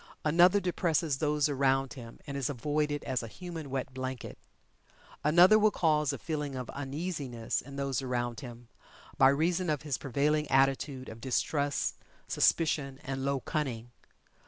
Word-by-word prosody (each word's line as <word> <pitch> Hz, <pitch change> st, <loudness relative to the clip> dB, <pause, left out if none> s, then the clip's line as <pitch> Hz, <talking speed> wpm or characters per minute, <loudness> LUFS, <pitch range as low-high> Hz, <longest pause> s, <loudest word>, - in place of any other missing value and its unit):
Another 175 Hz, +6 st, +5 dB
depresses 170 Hz, -5 st, 0 dB
those 150 Hz, -1 st, +2 dB
around 135 Hz, -2 st, +1 dB
him, 115 Hz, -2 st, -10 dB
and 140 Hz, -2 st, -6 dB
is 140 Hz, -1 st, -1 dB
avoided 145 Hz, +2 st, -1 dB
as 130 Hz, -2 st, -1 dB
a 115 Hz, -, -6 dB
"human 165 Hz, -, -7 dB
wet 130 Hz, -1 st, -3 dB
blanket." 130 Hz, -1 st, -5 dB, 0.8 s
Another 175 Hz, +8 st, +7 dB
will 215 Hz, 0 st, +5 dB
cause 150 Hz, -6 st, +2 dB
a 140 Hz, -, -4 dB
feeling 150 Hz, -4 st, -4 dB
of 125 Hz, -2 st, -5 dB
uneasiness 140 Hz, -4 st, -3 dB
in 140 Hz, +1 st, -11 dB
those 140 Hz, -2 st, -1 dB
around 120 Hz, -2 st, -2 dB
him, 120 Hz, -3 st, -10 dB, 0.5 s
by 135 Hz, -, +8 dB
reason 170 Hz, +5 st, +1 dB
of 150 Hz, -2 st, -1 dB
his 145 Hz, -4 st, -2 dB
prevailing 150 Hz, +3 st, 0 dB
attitude 135 Hz, 0 st, +1 dB
of 110 Hz, +1 st, -9 dB
distrust, 140 Hz, +3 st, -1 dB, 0.3 s
suspicion, 145 Hz, -5 st, +2 dB
and 135 Hz, -2 st, -4 dB
low 140 Hz, -1 st, 0 dB
cunning. 120 Hz, -7 st, -3 dB
140 Hz, 150 wpm, -30 LUFS, 130-155 Hz, 0.8 s, by